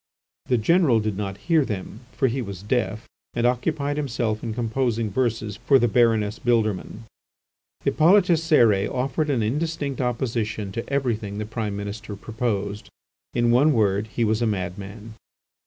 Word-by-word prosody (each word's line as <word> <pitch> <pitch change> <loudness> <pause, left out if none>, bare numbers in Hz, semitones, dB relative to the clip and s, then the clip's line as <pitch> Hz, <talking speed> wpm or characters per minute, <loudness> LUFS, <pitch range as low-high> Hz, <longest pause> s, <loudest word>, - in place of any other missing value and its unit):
The 125 - +3
General 135 0 +3
did 105 -2 -2
not 100 -1 -4
hear 160 +2 +2
them, 105 -3 -5
for 135 - +1
he 130 +2 -1
was 100 -4 -7
deaf 110 -1 -1 0.3
and 120 0 +1
occupied 140 +4 0
himself 120 -6 -1
in 115 - -4
composing 115 -1 -1
verses 110 -3 -1
for 135 +4 +4
the 120 - +3
Baroness 115 -2 +2
Bildermann. 110 -3 0 0.8
Hippolyte 180 +6 +5
Cérès 155 - +3
offered 135 +4 -1
an 125 -6 +1
indistinct 145 +3 -2
opposition 115 -4 -2
to 115 +4 -5
everything 115 -7 -1
the 105 - -3
Prime 110 -2 -3
Minister 100 +1 -6
proposed. 105 -1 -3 0.5
In 120 0 +3
a 130 +5 +5
word, 105 -5 +2
he 115 +2 -2
was 110 +1 +1
a 120 - +2
madman. 100 +2 -5
115 Hz, 150 wpm, -24 LUFS, 105-130 Hz, 0.8 s, Hippolyte